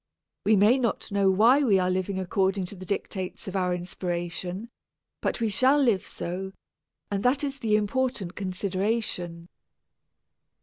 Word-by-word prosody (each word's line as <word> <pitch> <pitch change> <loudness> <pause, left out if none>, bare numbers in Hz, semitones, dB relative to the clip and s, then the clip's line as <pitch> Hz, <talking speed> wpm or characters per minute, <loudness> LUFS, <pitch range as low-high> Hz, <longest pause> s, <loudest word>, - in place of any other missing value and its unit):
We 215 +1 +5
may 210 +6 +5
not 235 -5 -1
know 200 -1 +3
why 230 +9 +5
we 220 -9 +4
are 185 0 +1
living 185 +1 -1
according 190 +1 0
to 190 - -8
the 185 -1 -10
dictates 190 -2 -4
of 190 - -5
our 180 -2 +1
inspiration, 180 +3 -4 0.5
but - - -1
we 225 -2 +1
shall 255 +8 +4
live 235 -10 +2
so 190 +2 -5 0.6
and 200 -1 0
that 255 +5 +2
is 275 -1 -2
the 220 -3 +2
important 215 -3 -1
consideration. 185 -2 -2
195 Hz, 145 wpm, -27 LUFS, 185-225 Hz, 0.6 s, We